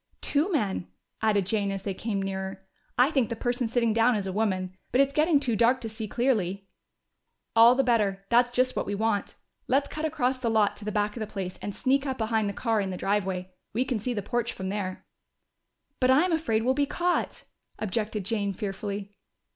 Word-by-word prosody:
"Two 305 +7 +1
men," 200 - 0 0.3
added 210 -3 +2
Jane 205 0 0
as 195 -1 -4
they 200 - -2
came 200 0 -2
nearer. 190 0 -4 0.3
"I 255 +4 +5
think 265 -7 +1
the 230 - -2
person 245 +1 -1
sitting 235 -1 +1
down 230 +2 +4
is 205 -2 -1
a 190 - -3
woman. 185 -3 -1 0.2
But 250 - +2
it's 275 0 +4
getting 305 0 +4
too 250 -5 0
dark 235 +4 +4
to 225 - -4
see 220 0 -5
clearly." 200 -5 0 0.9
"All 230 +2 +8
the 270 - +3
better! 205 -6 +1
That's 240 +1 +5
just 255 +1 +1
what - - -2
we 205 - -1
want. 215 -1 -1 0.3
Let's 275 +2 +2
cut 310 - -5
across 265 -5 0
the 240 -2 0
lot 215 -2 +3
to 205 - -8
the 210 - -2
back 210 0 0
of - - -5
the 215 - -3
place, 190 -3 -5
and 205 - -5
sneak 275 +2 +1
up 260 -1 -2
behind 220 -2 0
the - - -1
car 225 +1 0
in 195 - -2
the 185 - -4
driveway. 190 -2 -1 0.2
We 245 +4 +1
can 250 -4 -1
see 245 +4 -2
the 205 - -2
porch 240 +2 -1
from 190 0 -5
there." 190 -2 -4 0.9
"But 255 - +3
I'm 320 +7 +4
afraid 225 -9 +1
we'll 260 - +4
be 285 +1 +1
caught," 350 +4 -1 0.3
objected 210 -1 -2
Jane 200 -2 -1
fearfully. 200 0 -4
220 Hz, 210 wpm, -27 LUFS, 200-250 Hz, 0.9 s, All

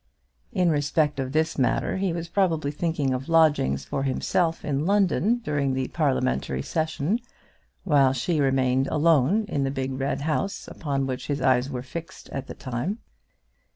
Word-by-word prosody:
In 180 -2 +2
respect 145 0 +1
of 130 -1 -2
this 160 +1 0
matter 130 - +1
he 190 -1 0
was 170 0 -4
probably 165 -5 +1
thinking 150 -3 -1
of 130 +4 -4
lodgings 150 - +3
for 135 - -3
himself 160 +5 0
in 145 +2 -1
London 205 +3 +3
during 140 -7 0
the 130 -1 -2
parliamentary 65 - 0
session, 160 +5 -1 0.6
while 140 -6 +4
she 150 +4 0
remained 130 -1 +2
alone 160 - +3
in 140 -8 -1
the 135 - 0
big 135 -1 -3
red 135 +1 -1
house 160 +6 -2
upon 140 -3 -2
which 130 -1 -4
his 145 -1 -1
eyes 130 0 +2
were 125 -3 -4
fixed 165 +5 -8
at 135 - -5
the - - -8
time. 130 - -3
145 Hz, 160 wpm, -25 LUFS, 135-165 Hz, 0.6 s, while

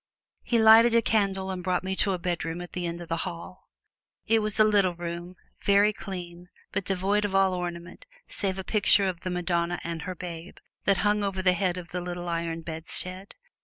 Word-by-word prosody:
He 235 - 0
lighted 225 +1 +7
a 230 - +5
candle 195 -3 0
and 180 -1 -5
took 180 0 0
me 190 0 -2
to 195 - +2
a - - -1
bedroom 175 -1 -3
at 175 - -9
the 180 -1 -2
end 170 +1 -5
of 170 - -8
the 165 0 -1
hall. 170 +2 -7 0.6
It 225 0 +3
was 215 0 0
a - - +8
little 200 -4 +3
room, 175 +1 -6 0.3
very 200 +1 +4
clean, 180 -3 -8 0.2
but 200 -1 -2
devoid 195 +2 +1
of 200 -2 -2
all 195 -1 +4
ornament, 175 - -6 0.2
save 195 -2 -2
a 190 - -4
picture 200 0 +4
of 180 -2 -3
the 185 - -5
Madonna 175 -1 -1
and 165 -1 -4
her 185 - -5
Babe, 170 0 -8 0.3
that 200 -1 +3
hung 205 0 +2
over 195 -2 -2
the 180 -1 +4
head 185 -1 -1
of 175 -1 -8
the 180 - -4
little 175 0 -5
iron 165 -1 -2
bedstead. 180 +4 -3
185 Hz, 205 wpm, -27 LUFS, 175-200 Hz, 0.6 s, a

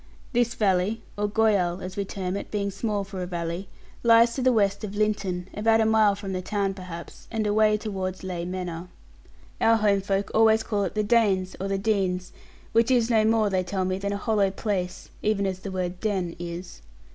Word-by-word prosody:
This 240 -1 +1
valley, 195 +1 +1
or 205 0 -1
goyal, 205 -5 +2
as 185 0 -7
we 200 - -2
term 190 -1 -4
it, 200 - -5
being 200 -1 -1
small 205 +1 -2
for 195 -1 -7
a 180 - -3
valley, 170 +1 -4 0.3
lies 230 0 +6
to 265 - -3
the 255 0 +4
west 200 -3 +1
of 205 -1 -5
Linton, 200 -4 -1
about 225 +2 +3
a 220 - +3
mile 220 -2 +4
from 200 -1 -6
the 185 - -2
town 200 0 -1
perhaps, 180 -3 -9
and 220 -2 -1
away 215 0 +3
towards 190 -4 -4
Ley 180 -2 -4
Manor. 180 -1 -5 0.7
Our 225 0 +5
homefolk 200 -1 +1
always 220 0 +5
call 205 -3 0
it 185 - -5
the 215 - +1
Danes, 205 -4 +2
or 195 - -1
the 195 0 0
Denes, 195 -3 0 0.4
which 230 +2 +3
is 245 -2 +3
no 220 -2 +4
more, 220 -2 +3
they 185 -1 +1
tell 185 +1 -2
me, 185 +1 -1
than 200 +1 -2
a 200 - -1
hollow 205 -2 +1
place, 190 -2 -3
even 210 -2 +1
as 190 -1 -2
the 195 - -6
word 180 -1 -3
'den' 190 -5 -1
is. 175 +1 -7
200 Hz, 205 wpm, -26 LUFS, 185-215 Hz, 0.7 s, lies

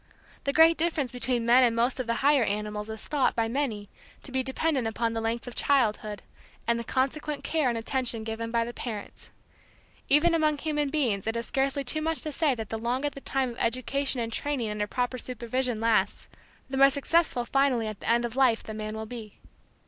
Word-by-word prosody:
The 280 - +2
great 325 +3 +6
difference 315 -6 0
between 245 -1 -1
men 245 +2 +6
and 235 -2 +3
most 240 +3 +1
of 255 - -3
the 230 - +1
higher 285 -3 +5
animals 210 0 -3
is 220 0 -5
thought 285 -4 +1
by 230 -1 +1
many 225 -5 -2 0.4
to - - -7
be 260 0 +1
dependent 265 -1 0
upon 230 +1 -1
the 225 - -2
length 225 +1 -2
of 245 - -7
childhood, 215 -7 +1 0.4
and 235 0 +1
the - - -4
consequent 280 +4 -1
care 310 -5 +1
and 235 - -1
attention 235 -1 -1
given 225 +1 -4
by 230 0 +1
the 240 - -6
parents. 215 -5 -7 0.8
Even 315 +4 +5
among 310 -2 +2
human 295 -1 -1
beings 240 -10 0
it 225 +1 0
is 230 - -3
scarcely 275 +1 0
too 310 +4 0
much 320 -3 -1
to 305 - -3
say 290 -2 +2
that 220 -3 -6
the 225 - -3
longer 255 +5 -1
the 275 - -10
time 265 -2 -1
of 235 - -11
education 255 +3 0
and 230 -1 -3
training 260 -7 -1
under 210 0 -2
proper 250 +3 -2
supervision 245 0 -2
lasts, 220 -3 +1 0.4
the 265 0 -4
more 275 0 +7
successful 280 -2 +1
finally 270 -3 +2
at 215 -2 -5
the - - -4
end 235 +1 +3
of 235 0 -5
life 255 -4 +3
the 220 - -7
man 215 0 -5
will 220 0 -5
be. 220 -2 -9
245 Hz, 210 wpm, -27 LUFS, 225-275 Hz, 0.8 s, more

